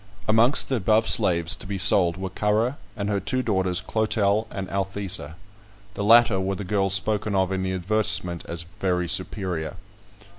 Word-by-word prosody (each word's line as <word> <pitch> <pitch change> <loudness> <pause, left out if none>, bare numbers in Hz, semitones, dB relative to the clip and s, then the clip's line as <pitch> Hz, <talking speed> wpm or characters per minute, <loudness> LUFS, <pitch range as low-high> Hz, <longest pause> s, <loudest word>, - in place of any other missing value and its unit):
Amongst 115 +5 +3
the 130 - 0
above 110 +2 +1
slaves 85 +1 +2
to - - -12
be 100 0 -4
sold 90 -3 +4
were 95 0 -5
Currer 110 +7 0 0.2
and 100 -1 -3
her 100 -1 -1
two 130 +7 -2
daughters, 95 -5 0
Clotel 110 -1 0
and 95 -2 -6
Althesa; 95 -4 -3 0.6
the 100 - -4
latter 115 -2 +5
were 95 +1 -2
the 100 - -6
girls 95 0 +2
spoken 105 +1 0
of 95 -1 +1
in 95 -1 -2
the 95 0 -2
advertisement 95 -2 -1
as 85 0 -7
"very 90 -2 -1
superior." 90 -3 -2
95 Hz, 170 wpm, -24 LUFS, 95-110 Hz, 0.6 s, latter